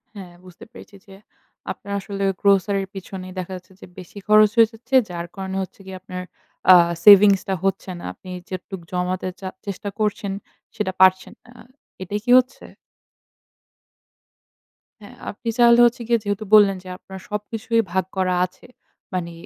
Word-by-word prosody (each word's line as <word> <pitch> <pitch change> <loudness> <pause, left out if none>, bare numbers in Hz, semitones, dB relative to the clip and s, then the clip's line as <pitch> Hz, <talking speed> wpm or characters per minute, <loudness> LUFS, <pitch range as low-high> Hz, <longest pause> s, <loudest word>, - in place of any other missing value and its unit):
হ্যাঁ, 185 -3 -10
বুঝতে 180 -1 -14
পেরেছি 205 - -14
যে 195 - -13 0.6
আপনার 200 - -8
আসলে 195 0 -5 0.2
grocery 200 0 +2
র - - -26
পিছনেই 185 -1 -8
দেখা 185 +1 -6
যাচ্ছে 185 +1 -13
যে - - -10
বেশি 185 +2 -12
খরচ 215 0 +6
হয়ে 225 -1 +6
যাচ্ছে। 245 +3 -5
যার 170 -1 -5
কারণে 190 -1 -5
হচ্ছে 190 - -12
গিয়ে 190 -1 -8
আপনার 180 -1 -7 0.5
আ - - +11 0.3
সেভিংসটা 200 -1 +7
হচ্ছে 195 -1 -2
না। - - -11
আপনি 185 - -15 0.2
যেটুকু 185 0 -7
জমাতে 180 +1 -2
চা 190 - -6 0.2
চেষ্টা 200 0 -5
করছেন, 210 -1 -1 0.4
সেটা 210 -4 -2
পারছেন 190 0 +4
না। - - -19
আ - - -12 0.4
এটাই 205 +3 -3
কি 245 - +1
হচ্ছে? 255 +1 -5 2.4
হ্যাঁ, 230 +4 -13
আপনি 230 +3 -6
তাহলে 235 -1 +6
হচ্ছে 240 0 0
গিয়ে 235 -1 +2
যেহেতু 205 +1 -3
বললেন 200 -2 +6
যে - - -14
আপনার 190 0 -11
সবকিছুই 220 +2 -1
ভাগ 190 +1 0
করা 185 -1 +1
আছে। 185 +1 -16 0.5
মানে 175 -2 -3
195 Hz, 160 wpm, -21 LUFS, 185-210 Hz, 2.4 s, আ